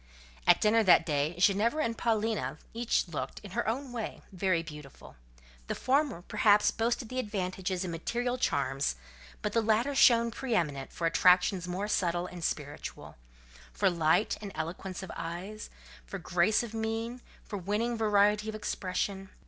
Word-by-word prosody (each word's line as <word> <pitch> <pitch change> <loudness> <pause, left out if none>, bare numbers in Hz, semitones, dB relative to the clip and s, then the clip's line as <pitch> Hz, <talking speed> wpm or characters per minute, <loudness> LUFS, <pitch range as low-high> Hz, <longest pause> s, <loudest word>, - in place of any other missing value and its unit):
At - - +7
dinner 220 +1 +4
that 180 -5 +6
day, 150 +1 0
Ginevra 210 +10 +3
and 230 0 -1
Paulina 225 -1 0 0.2
each 230 -3 0
looked, 165 -4 -5
in 200 - -9
her - - -1
own 255 +4 -2
way, 230 -3 -5
very 185 -3 0
beautiful; 150 -4 -11 0.5
the - - -2
former, 265 - +1
perhaps, 210 +1 +4
boasted 235 +1 -1
the 255 - -3
advantage 190 -4 -3
in 185 -1 -2
material 240 +9 -2
charms, 135 - 0 0.5
but 210 - -1
the 230 - +3
latter 225 +5 +2
shone 235 -3 +5
pre 250 -1 -2
eminent 145 -7 -1
for 170 - -3
attractions 180 +2 +4
more 185 +3 -2
subtle 175 -4 0
and 180 -1 -8
spiritual: 145 -2 -5 0.6
for - - +2
light 170 +4 +2
and 205 -2 -6
eloquence 175 +4 -5
of 190 - -7
eye, 175 +5 -5 0.5
for - - -6
grace 180 +6 +2
of 230 -2 -7
mien, 225 +2 -3 0.2
for 205 - -6
winning 210 +6 -1
variety 210 -1 +3
of 215 - -4
expression. 195 -1 -3
205 Hz, 155 wpm, -30 LUFS, 175-225 Hz, 0.6 s, At